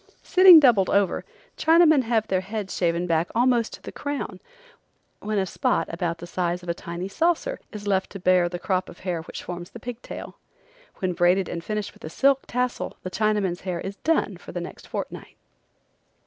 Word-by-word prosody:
Sitting 370 -3 +9
doubled 235 -10 +4
over, 200 -2 +2 0.3
Chinamen 320 -3 +5
have 225 -2 +1
their 185 -1 +1
heads 200 0 -5
shaven 170 0 0
back 165 0 +1
almost 240 -1 +2
to - - -11
the - - -7
crown, 285 0 -4 0.8
when 215 0 -2
a 195 - +2
spot 180 - 0
about 170 0 -2
the 170 - -8
size 175 0 -2
of 175 - -8
a - - +2
tiny 170 +2 -6
saucer 345 - 0
is 210 -1 -8
left 195 -2 +1
to 195 - -8
bear 180 -1 +3
the 175 - -4
crop 185 0 -1
of - - -13
hair 180 -3 -2
which 160 - -8
forms 175 0 -7
the 235 - -11
pig 245 +1 -7
tail. - - -9 0.6
When 185 -1 -2
braided 175 +2 +3
and 170 - -5
finished 210 0 -3
with - - -20
a 155 - -5
silk 270 - +2
tassel 250 0 -2
the 185 - -5
Chinaman's 210 -4 0
hair 180 -2 -3
is 195 +2 -6
"done" 325 +1 0
for - - -11
the - - -4
next - - -9
fortnight. - - -6
195 Hz, 195 wpm, -25 LUFS, 175-240 Hz, 0.8 s, Sitting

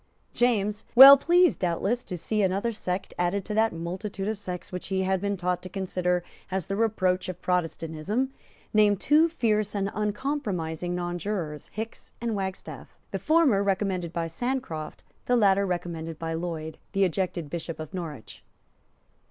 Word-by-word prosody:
James, 210 -3 +1
well 270 +3 +13
pleased, 345 +5 +3
doubtless, 195 +7 0
to 180 - -5
see 210 +6 -1
another 195 +4 +1
sect 190 -3 -4
added 180 +2 0
to 210 - -4
that 220 +1 +3
multitude 190 +4 -5
of 215 -1 -2
sects 180 -3 -6
which 180 -1 -5
he 190 0 0
had 190 -1 0
been 200 0 -1
taught 180 0 -1
to 185 - -8
consider 180 -1 -1 0.3
as 190 -2 -2
the 195 - -3
reproach 190 -5 +1
of 180 -1 -6
Protestantism, 180 +7 -1 0.4
named 210 -2 +4
two 310 +8 +4
fierce 215 -9 0
and 200 0 -1
uncompromising 205 - -2
nonjurors, 175 -3 -3
Hickes 220 +1 -6
and 230 -2 -2
Wagstaffe, 190 -1 -6
the - - -2
former 310 -10 +3
recommended 190 -3 -1
by 170 -1 -2
Sancroft, 165 - -4 0.2
the 245 - +3
latter 200 -3 +4
recommended 165 -3 -4
by 165 0 -3
Lloyd, 160 -2 -4
the 195 -1 +3
ejected 180 -2 -1
Bishop 165 -1 -5
of 155 +3 -7
Norwich. 160 -10 -7
190 Hz, 155 wpm, -27 LUFS, 175-215 Hz, 0.4 s, well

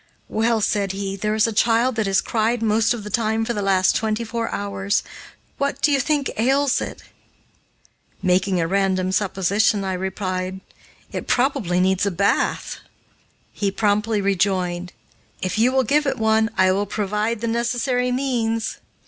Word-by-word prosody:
"Well," 225 0 +1
said 200 -2 0
he, 195 0 -4
"there 210 +2 -1
is 220 - +3
a 225 - -1
child 230 +3 +2
that 220 -2 0
has 195 -1 +2
cried 230 +1 0
most 220 0 +2
of 235 -3 -2
the 210 - -7
time 220 +1 0
for 235 - -1
the 210 - -2
last 190 -2 +3
twenty 220 +1 -1
four 230 0 -3
hours. 200 0 -1 0.6
What 280 0 -1
do 300 - +2
you 280 - +3
think 285 0 0
ails 270 +4 +2
it?" - - -6 1.2
Making 185 0 +1
a 165 - 0
random 190 0 +1
supposition, 200 +2 +1
I 190 -1 -2
replied, 185 0 -3 0.5
"It - - -5
probably 245 -9 +1
needs 190 +2 +2
a - - +3
bath." 200 +2 0 0.7
He 200 - -1
promptly 210 +1 +1
rejoined, 185 -2 0 0.5
"If 185 +3 -2
you 240 +3 +4
will 265 0 +2
give 290 +5 +2
it - - 0
one, 220 0 +2
I 185 0 +4
will 200 +2 0
provide 210 +2 -2
the 230 - -1
necessary 245 +2 0
means." 235 -4 -1
210 Hz, 165 wpm, -22 LUFS, 195-230 Hz, 1.2 s, you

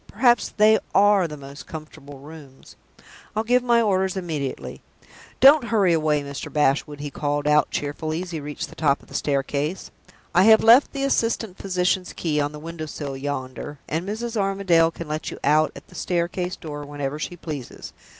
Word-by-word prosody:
perhaps 240 +2 +3
they 215 +1 +5 0.2
are 200 -2 +5
the 150 -1 -8
most 140 0 -11
comfortable 150 -3 -10
rooms. 140 -1 -14 0.6
I'll 220 - 0
give 245 +2 +3
my 235 -1 +3
orders 190 -2 +1
immediately. 155 -7 -4 0.6
Don't 275 0 +7
hurry 205 -7 +2
away, 155 -2 +1
Mr. 140 0 -7
Bashwood," 145 0 +1
he 145 -1 -5
called 145 0 -2
out, 150 0 +4
cheerfully, 155 +3 -3
as 180 - -9
he 160 - -4
reached 145 0 -6
the - - -13
top 145 -3 +1
of - - -20
the - - -13
staircase. 145 +4 -2 0.4
"I 180 +2 +5
have 220 0 +7
left 235 +5 +6
the 275 -1 -3
assistant 230 -7 0
physician's 180 -1 -1
key 150 -3 -1
on 145 0 -1
the 150 - -9
window 160 +1 -7
sill 140 -2 -6
yonder, 135 +1 -5
and 170 +5 -3
Mrs. 230 +2 -4
Armadale 195 -5 +2
can 165 -1 -8
let 155 +1 -3
you - - -8
out 155 +2 +3
at - - -11
the - - -18
staircase 175 0 -2
door 145 -3 -7
whenever 145 0 -5
she 175 +3 -5
pleases. 150 -7 -7
160 Hz, 180 wpm, -23 LUFS, 145-195 Hz, 0.6 s, Don't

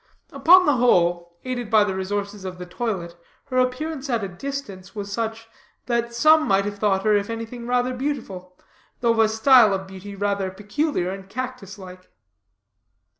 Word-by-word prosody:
Upon 345 +7 +6
the 290 -5 +3
whole, 175 -7 +2
aided 245 -3 -4
by 215 -2 +5
the 200 -2 -2
resources 200 +1 -4
of 185 -1 -6
the 180 - -7
toilet, 180 -3 -4 0.3
her 255 - +1
appearance 275 +3 -2
at 195 -7 -3
distance 220 -10 -6
was 200 -1 -5
such, 225 0 -4 0.4
that 235 -1 -1
some 310 +5 +5
might 195 0 +2
have 205 0 -5
thought 195 -2 +1
her, 215 -1 +3
if 205 +1 0
anything, 230 +1 -6
rather 250 +1 +1
beautiful, 225 -10 -5 0.4
though 235 -1 +3
of 230 - 0
a 220 -1 +5
style 220 -2 +5
of 190 0 -5
beauty 190 +1 -10
rather 200 -1 -1
peculiar 205 - -2
and 195 0 -9
cactus 250 -4 -6
like. 185 -1 -12
210 Hz, 170 wpm, -23 LUFS, 190-250 Hz, 0.4 s, Upon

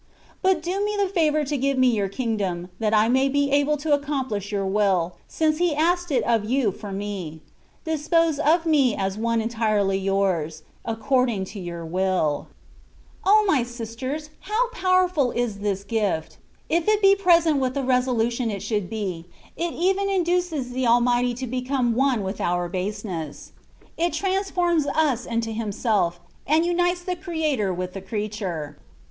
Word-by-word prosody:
But 375 -4 +2
do 375 +4 -1
me 420 0 -1
the 400 -1 +2
favour 310 -5 +1
to 290 +1 -2
give 275 +1 0
me 255 -1 +5
Your 205 -5 0
Kingdom, 195 -6 -2
that 215 -2 +1
I 215 0 +4
may 265 +3 +3
be 285 0 +1
able 285 +1 +2
to 295 +1 0
accomplish 265 -9 -2
Your 200 -1 -1
will, 190 -3 +1
since 310 -1 0
He 345 -4 +2
asked 350 +3 +1
it 275 - +1
of 230 -3 +2
You 240 -1 +1
for 205 +1 -8
me; 190 -6 -5 0.4
dispose 320 0 +1
of 325 +3 +3
me 280 -8 +3
as 195 +1 -2
one 230 0 +1
entirely 215 -4 +1
Yours, 185 -5 0 0.2
according 230 -2 0
to 205 - -7
Your 170 -2 -6
wilL 180 -3 0 0.8
O 425 +2 +6
my 300 -9 +3
sisters! 240 +6 -5
how 445 +5 0
powerful 370 - +2
is 235 -4 -2
this 200 -1 -2
gift! 200 -7 -2 0.3
If 335 +3 0
it 425 -1 +4
be 390 0 +8
presented 335 -6 +4
with 260 0 -1
the 275 - -1
resolution 250 -2 +1
it 200 -3 -4
should 205 -5 -2
be, 190 -6 -4 0.3
it 340 0 -2
even 385 +3 +1
induces 350 -7 0
the 255 0 -1
Almighty 240 +1 +3
to 260 +2 -4
become 255 0 -1
one 255 -3 +1
with 190 +2 -4
our 175 0 0
baseness: 185 -4 -5 0.5
it 340 +1 0
transforms 360 -5 0
us 280 -5 +1
into 230 -1 -1
Himself, 210 -5 0 0.3
and 315 +3 +3
unites 350 0 +1
the 360 0 -2
Creator 315 - -1
with 180 0 -4
the 195 - -6
creature. 190 -7 -4
245 Hz, 165 wpm, -24 LUFS, 200-315 Hz, 0.8 s, be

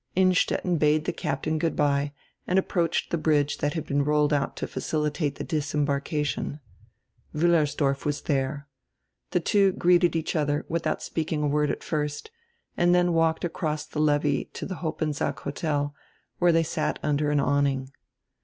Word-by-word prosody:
Innstetten 185 -2 +2
bade 150 0 +3
die - - -1
captain 155 0 -2
goodbye 145 -3 +1 0.4
and 180 - +2
approached 170 -3 0
die 170 - 0
bridge 150 -2 +1
diat 145 - 0
had 160 -3 -3
been 140 0 +1
rolled 150 0 +2
out 140 -2 0
to - - -3
facilitate 150 -1 -2
die - - -5
disembarkation. 145 -1 -1 0.8
Wiillersdorf 150 -4 +2
was 150 -1 -1
diere. 140 0 -1 0.6
The - - +1
two 195 -2 +3
greeted 175 -1 +3
each 160 -1 -1
odier, 145 -2 0
widiout 170 0 -2
speaking 155 -2 -2
a - - +2
word 150 0 +1
at - - -3
first, 150 - -3 0.4
and 175 0 +3
dien 175 -1 +3
walked 165 0 +2
across 155 -3 -2
the 150 - -6
levee 145 -2 +2
to - - -5
die 185 - -4
Hoppensack 155 -2 -2
Hotel, 145 0 -2 0.5
where 175 -1 +5
diey 165 0 +3
sat - - -2
down - - 0
under 145 +1 +1
an 145 -1 +2
awning. 140 -1 +1
150 Hz, 160 wpm, -26 LUFS, 145-165 Hz, 0.8 s, where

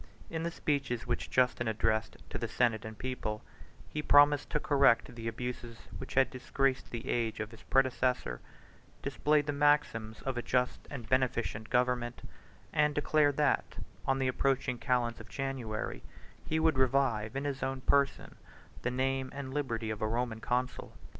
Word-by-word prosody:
In 160 -1 -2
the 170 - -1
speeches 135 -7 -1
which 120 0 -2
Justin 125 -2 +2
addressed 110 0 0
to - - -3
the - - -2
senate 115 -3 +1
and 110 -1 -7
people, 120 -4 -4 0.4
he 150 - -3
promised 145 0 +5
to 150 - 0
correct 135 -6 +3
the 115 -1 -6
abuses 120 0 -5 0.2
which - - -7
had 135 0 +4
disgraced 130 +1 0
the 120 -1 -6
age 115 -2 0
of 110 0 -4
his 115 - -13
predecessor, 130 - +1 0.6
displayed 150 -1 +2
the 145 - -1
maxims 140 -7 +1
of 135 -2 -2
a - - -1
just 125 +1 0
and 125 -6 -7
beneficent 120 -4 0
government, 125 -1 0 0.5
and 150 -1 +3
declared 150 -1 +3
that, 150 - +1 0.3
on 135 0 +3
the 135 -1 +1
approaching 130 -1 0
calends 120 -2 0
of 110 -4 -11
January, 125 -3 -3 0.5
3 - - -9
he 160 - +1
would 160 -4 +3
revive 125 -4 +2
in 135 - -2
his 140 -2 -2
own 135 0 -2
person 140 +1 +1 0.4
the 125 - 0
name 130 +1 0
and 135 -2 -5
liberty 115 -6 -2
of 110 - -5
a 110 - +1
Roman 115 0 -1
consul. 125 +2 -2
130 Hz, 165 wpm, -32 LUFS, 115-140 Hz, 0.6 s, promised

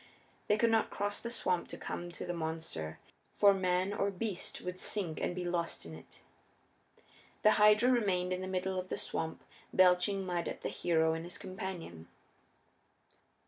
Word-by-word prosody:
They 210 - +4
could 230 +1 +3
not 225 -1 +3
cross 205 0 -2
the 235 - -4
swamp 180 -7 0
to - - -7
come 175 0 -5
to - - -5
the 175 - -2
monster, 160 - -4 0.4
for 200 -1 +6
man 185 +1 +1
or 200 -1 +1
beast 200 -1 -3
would 180 0 -5
sink 180 -7 -1
and 175 - -1
be 180 -1 -3
lost 175 -1 -2
in 80 - -8
it. 80 - -13 1.2
The 215 - +7
Hydra 210 +4 +6
remained 185 -7 +2
in 185 - -3
the 185 - -4
middle 185 0 -1
of 185 0 -6
the - - -2
swamp 160 0 -4 0.3
belching 185 +2 +4
mud 175 -2 -1
at - - -7
the - - -1
hero 160 -2 +2
and 165 0 -3
his 175 +1 -7
companion. 185 - -6
185 Hz, 175 wpm, -33 LUFS, 170-200 Hz, 1.2 s, The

